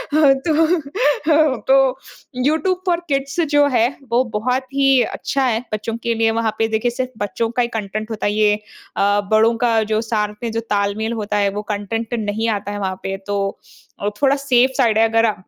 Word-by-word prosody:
तो 310 - +2
तो 270 -1 +4 0.4
यूट्यूब 320 +8 0
पर 345 -1 +2
किड्स 275 +3 -1
जो 290 -1 +4
है, 245 -4 +3 0.2
वो 245 +2 +3
बहुत 250 +5 0
ही 270 -2 +4
अच्छा 275 - -2
है। 230 -1 0
बच्चों 215 +2 -3
के 235 - +1
लिए 225 0 +2
वहाँ 225 -1 0
पे 225 - +1
देखिए 220 +2 0
सिर्फ़ 255 +1 -4
बच्चों 205 +3 -2
का 245 - 0
ही 235 - +1
कंटेंट 215 +1 -4
होता 220 - -3
है। 205 - +1
ये 210 -1 +3 0.4
अ, 205 +1 +2
बड़ों 220 +2 +4
का 230 -2 +2
जो 215 0 0
साथ 210 -2 -1
में 230 - -2
जो 225 - -2
तालमेल 205 +2 0
होता 210 -2 -2
है, 200 -1 +2
वो 205 +1 -4
कंटेंट 225 +3 -3
नहीं 220 0 -1
आता 205 0 -7
है 205 - -4
वहाँ 190 -1 -2
पे। 195 0 -3
तो 200 -1 -2 0.4
अ, 205 - -1
थोड़ा 275 0 +4
सेफ 260 -2 +3
साइड 230 -5 +3
है 225 0 +4
अगर 225 -1 +3
230 Hz, 195 wpm, -19 LUFS, 210-270 Hz, 0.4 s, तो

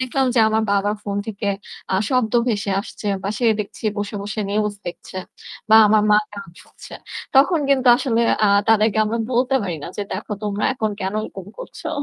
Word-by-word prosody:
দেখলাম 260 +1 0
যে 230 - +4
আমার 220 0 +1
বাবার 205 +1 +1
phone 200 0 -2
থেকে 205 -1 -3 0.5
আ - - +3
শব্দ 250 -4 +1 0.2
ভেসে 205 -3 -1
আসছে 205 0 -7
বা 195 - -2
সে 240 - +1
দেখছি 210 +2 -8
বসে, 205 +1 -4
বসে 210 +2 -4
news 210 0 0
দেখছে 185 +2 -7 0.5
বা 220 - +9
আমার 215 0 +4
মা 210 - +7 0.2
গান 200 -4 -9
শুনছে। - - -13 0.4
তখন 320 +5 +5
কিন্তু 260 -2 +2
আসলে 235 -4 0 0.2
আ - - +3 0.2
তাদেরকে 220 0 +3
আমরা 225 +2 -2
বলতে 255 +3 +1
পারি 175 -4 -3
না - - -6
যে 205 - -2
"দেখো, 210 +2 -5
তোমরা 205 0 -2
এখন 220 -3 -1
কেন 190 +2 -2
এরকম 195 -3 -8
করছো?" - - -8
215 Hz, 190 wpm, -21 LUFS, 205-235 Hz, 0.5 s, বা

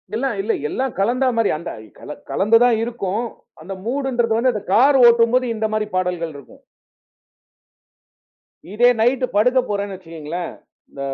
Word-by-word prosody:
எல்லாம் 255 0 -1
இல்ல 215 +3 -1 0.2
எல்லாம் 265 - -3
கலந்தா 245 +6 +1
மாரி 225 -2 +2
அந்த 170 - -7 0.3
கல - - -9 0.2
கலந்து 215 +4 +4
தான் 245 -2 +3
இருக்கும். 230 -2 -3 0.4
அந்த 185 +5 -7
மூடுன்றது 245 -2 -1
வந்து 250 +2 +2
அந்த 210 -2 -5
கார் 270 +5 +5
ஓட்டும்போது 235 +2 +4
இந்த 220 0 -2
மாரி 215 0 -1
பாடல்கள் 180 -3 -2
இருக்கும். 140 -2 -14 2.1
இதே 240 +3 +4
நைட் 245 +3 +2
படுக்கப் 250 +4 +2
போறேன்னு 200 -1 -3
வச்சுக்கோங்களேன், 165 -1 -7 0.4
ம - - -10
225 Hz, 140 wpm, -20 LUFS, 195-245 Hz, 2.1 s, கார்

